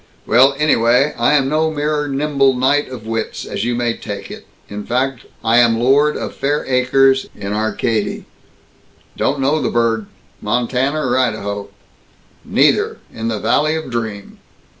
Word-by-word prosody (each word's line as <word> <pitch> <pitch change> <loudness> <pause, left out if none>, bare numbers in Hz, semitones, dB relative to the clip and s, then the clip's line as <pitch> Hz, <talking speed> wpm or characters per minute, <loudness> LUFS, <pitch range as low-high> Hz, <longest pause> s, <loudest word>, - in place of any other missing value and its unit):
Well, 135 +4 +4
anyway: 135 -1 +3
I 120 +5 +2
am 135 -2 +2
no 155 +3 +1
mere 150 -1 -1
nimble 140 -1 +1
knight 135 +3 +1
of 125 -4 -9
wits, 115 0 -4
as - - -4
you 120 +1 -1
may 120 -1 -1
take - - -7
it. - - -10 0.2
In 105 0 -6
fact, 130 +2 -2 0.2
I 115 +1 +3
am 115 -1 +4
lord 140 +5 +3
of - - -5
fair 145 +2 -1
acres 135 +1 +3
in 100 +1 -5
Arcady." 110 0 -1 0.9
"Don't 140 +1 0
know 145 +3 +1
the - - 0
burg. 115 -2 0 0.3
Montana 125 +6 0
or - - +1
Idaho?" 105 -5 -2 0.7
"Neither! - - +2 0.2
In 115 0 -4
the 110 -2 -1
valley 155 +7 +1
of 160 -5 -5
dream!" 110 -4 -5
125 Hz, 155 wpm, -18 LUFS, 115-140 Hz, 0.9 s, Well